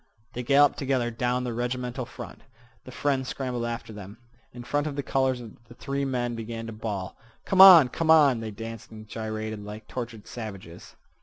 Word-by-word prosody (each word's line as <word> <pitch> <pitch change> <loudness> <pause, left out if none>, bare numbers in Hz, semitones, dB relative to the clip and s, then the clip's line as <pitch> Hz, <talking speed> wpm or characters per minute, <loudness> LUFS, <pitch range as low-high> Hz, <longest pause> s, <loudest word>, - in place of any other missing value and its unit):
They 125 - -4
galloped 140 +3 +4
together 130 -4 0
down 125 +2 -1
the 120 -2 -3
regimental 125 +1 -3
front. - - -10 0.4
The 130 - -10
friend 135 0 -1
scrambled 125 -3 -3
after 115 -1 -5
them. 105 0 -10 0.3
In 120 0 -9
front 145 +4 -1
of 145 - -4
the 140 - -3
colors 130 -2 0 0.2
the 120 - -14
three 140 +2 -3
men 125 -2 -2
began 115 0 -6
to 115 - -7
bawl: 105 -4 -5 0.3
"Come 190 -1 +4
on! 180 -8 +11
come 160 +6 -3
on!" 145 -6 +6
They 110 -1 -5
danced 115 +1 -8
and 110 -1 -12
gyrated 110 -1 -5
like 105 +1 -9
tortured 115 -4 -6
savages. 100 -7 -9
120 Hz, 180 wpm, -26 LUFS, 110-130 Hz, 0.4 s, on